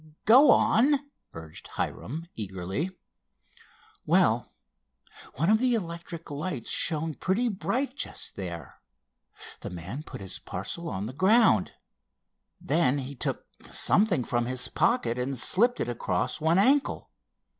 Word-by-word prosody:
"Go 255 +7 +7
on," 275 +6 +4 0.4
urged 80 -1 -10
Hiram 155 +8 -5
eagerly. 95 - -4 1.1
"Well, - - +2 0.8
one 165 +8 +2
of 220 - +4
the 250 -1 +2
electric 170 -4 -6
lights 145 -4 -3
shone 160 -1 +2
pretty 205 +10 0
bright 255 +6 -2
just - - -5
there. 85 -7 -8 0.8
The - - -7
man 90 - -7
put - - -10
his 95 -1 -6
parcel 110 - -6
on 95 +2 -4
the 120 - -6
ground. 190 - +3 0.9
Then 145 -2 +1
he 135 0 -5
took 130 - -3 0.2
something 195 - +4
from 120 0 -1
his 125 0 -1
pocket 180 - +1
and 130 +2 -2
slipped 235 - +3
it - - -1
across 115 -4 -2
one 160 +3 +3
ankle. 270 +8 +2
155 Hz, 125 wpm, -27 LUFS, -, 1.1 s, Go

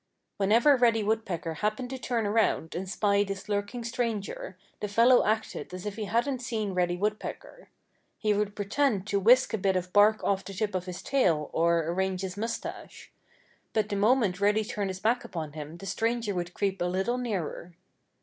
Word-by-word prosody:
Whenever 225 +8 +5
Reddy 230 -3 +3
Woodpecker 195 -6 -1
happened 215 +7 -2
to 265 - -5
turn 235 -3 -1
around 205 -6 +1
and 185 +2 -4
spy 200 0 +2
this 195 -1 -6
lurking 205 +4 -2
stranger 230 -5 -3 0.2
the 210 - -2
fellow 235 +5 +5
acted 215 -2 -2
as 185 - -8
if 205 -1 -4
he 215 -1 -4
hadn't 240 +5 0
seen 220 -5 -2
Reddy 175 -1 +1
Woodpecker. 210 - -4 0.5
He 215 -2 +1
would 205 0 -1
pretend 205 0 0
to 200 -1 0
whisk 245 +6 +5
a 220 - 0
bit 190 0 +1
of 180 0 -2
bark 210 +1 +5
off 195 -1 +1
the 195 - -8
tip 205 +1 -1
of 185 0 -3
his 180 -1 -6
tail, 170 - +1
or 170 0 +3
arrange 185 +3 -1
his 185 -1 -4
mustache. 230 +3 -6 0.6
But 215 -1 +1
the 205 - -1
moment 205 -3 +2
Reddy 210 +2 +3
turned 205 -3 -3
his 185 0 -5
back 230 +5 +1
upon 155 -4 -6
him 155 +1 -7
the 195 - -10
stranger 225 +2 -1
would 175 -1 -4
creep 195 -2 -1
a - - +2
little 190 +8 0
nearer. 180 -7 -4
205 Hz, 190 wpm, -28 LUFS, 185-225 Hz, 0.6 s, Whenever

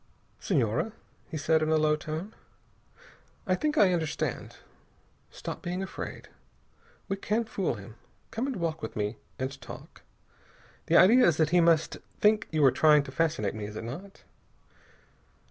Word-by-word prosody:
"Senhora," 135 - 0 0.4
he 155 - -4
said 160 +2 +2
in 155 - 0
a 160 - +4
low 155 0 +3
tone, 155 +7 -6 1.1
"I 185 - +1
think 300 +11 -1
I 190 -3 +5
understand. 160 -2 -3 0.7
Stop - - -7
being 180 +2 -3
afraid. 190 - -7 0.8
We 195 - -2
can 215 +4 0
fool 195 - -2
him. 110 +2 -11 0.3
Come 230 +4 -2
and 270 - -3
walk 165 -4 -2
with - - -6
me 105 +1 -2 0.2
and 135 +1 -4
talk. - - -11 0.9
The - - +5
idea 235 +8 +7
is 165 -3 +3
that 160 -1 +2
he 175 0 +5
must 165 -1 +3 0.2
think 210 +1 +3
you 155 -3 +2
are 135 - +7
trying 150 0 +5
to - - -9
fascinate 155 -12 0
me, 105 -1 -5
is 105 +1 -8
it 110 - -5
not?" 175 +12 -8
160 Hz, 160 wpm, -28 LUFS, 140-195 Hz, 1.1 s, idea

